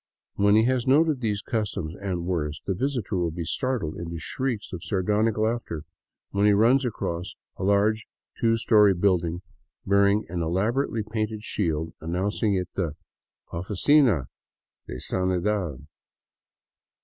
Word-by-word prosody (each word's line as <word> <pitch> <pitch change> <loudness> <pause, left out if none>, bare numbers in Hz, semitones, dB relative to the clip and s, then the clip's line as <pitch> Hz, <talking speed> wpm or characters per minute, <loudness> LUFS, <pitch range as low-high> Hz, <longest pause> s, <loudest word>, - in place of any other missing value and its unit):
When 100 +1 +4
he 110 - +5
has 125 0 +1
noted 150 0 +4
these 105 -3 -1
customs 105 -8 -2
and 95 -4 -3
worse, 75 -5 -2
the 95 - 0
visitor 115 -2 -2
will 85 -2 +1
be 85 +2 -5
startled 110 - -2
into 85 0 -5
shrieks 115 +7 -3
of 90 -1 -6
sardonic 105 +3 +1
laughter 110 -8 -1 0.5
when 100 +1 +2
he 105 - +6
runs 120 +7 +4
across 95 -7 -3 0.2
a - - -6
large 105 +2 +2 0.3
two 115 0 +3
story 105 -4 +5
building 90 -2 +1 0.4
bearing 100 +1 +3
an 85 +1 -3
elaborately 110 - 0
painted 110 0 -3
s'hield 80 -6 -1
announcing 95 +5 0
it 90 -2 -2
the 85 -6 -2 0.3
*' - - -42
Oficina 100 - +3 0.6
de - - -6
Sanidad." 90 -5 -1
100 Hz, 135 wpm, -26 LUFS, 85-110 Hz, 0.6 s, he